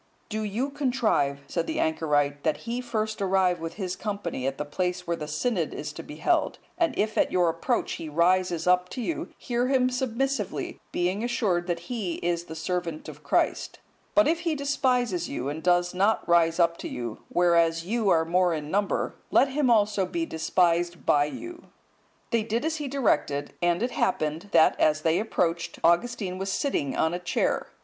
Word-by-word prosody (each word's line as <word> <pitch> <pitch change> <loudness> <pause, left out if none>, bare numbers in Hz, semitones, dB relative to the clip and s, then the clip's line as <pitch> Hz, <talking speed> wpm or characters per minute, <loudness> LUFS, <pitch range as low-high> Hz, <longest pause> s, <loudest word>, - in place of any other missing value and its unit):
—"Do 215 0 -2
you 230 +7 -2
contrive," 240 - 0
said 170 -1 -2
the - - -2
anchorite, 145 -3 +1
"that 155 +6 -1
he 235 +2 -2
first 220 -3 -3
arrive 190 -2 +2
with 165 +1 -6
his 185 -3 -3
company 195 - -3
at 135 0 -2
the 150 - -3
place 180 +4 -2
where 170 - -1
the 150 -2 -6
synod 165 +3 -1
is 150 0 -5
to - - -7
be 150 - -10
held; 155 +3 +1 0.2
and 330 -5 0
if 215 +1 0
at - - +2
your 180 -2 +3
approach 165 0 -1
he 160 - -5
rises 170 +1 +2
up 180 0 +3
to - - -6
you, 330 - -3
hear 245 0 -1
him 255 -1 +2
submissively, 260 +2 -2
being 185 +5 -1
assured 210 -8 0
that 170 -1 -2
he 195 -3 -3
is 170 0 -2
the 160 - -8
servant 165 -1 -3
of - - -10
Christ; - - 0 0.4
but 310 -1 +6
if 330 +2 +2
he 335 -3 -1
despises 255 - 0
you, 135 0 -3
and 150 +2 -5
does 175 0 +2
not 200 +4 +1
rise 170 0 +3
up 170 -1 +3
to - - -6
you, 120 -3 -5
whereas 170 -1 +3
you 220 +1 0
are 160 -2 +4
more 175 0 +2
in 150 0 -5
number, 200 +1 0 0.2
let 270 - +4
him 270 -1 +1
also 210 -4 +3
be 335 -1 -2
despised 170 - +1
by 145 0 +4
you." 340 - -8 0.7
They 230 -2 +2
did 230 +5 -2
as 320 0 0
he 295 -2 -4
directed; 175 - 0
and 175 +3 +2
it 245 - -1
happened, 155 +6 -1
that 160 -1 +5
as 155 0 +3
they 165 +2 +2
approached, 175 -6 -1
Augustine 185 +2 +1
was 195 0 -2
sitting 145 - -1
on 160 +1 +2
a 175 - -2
chair. 180 - 0
180 Hz, 190 wpm, -26 LUFS, 165-235 Hz, 0.7 s, but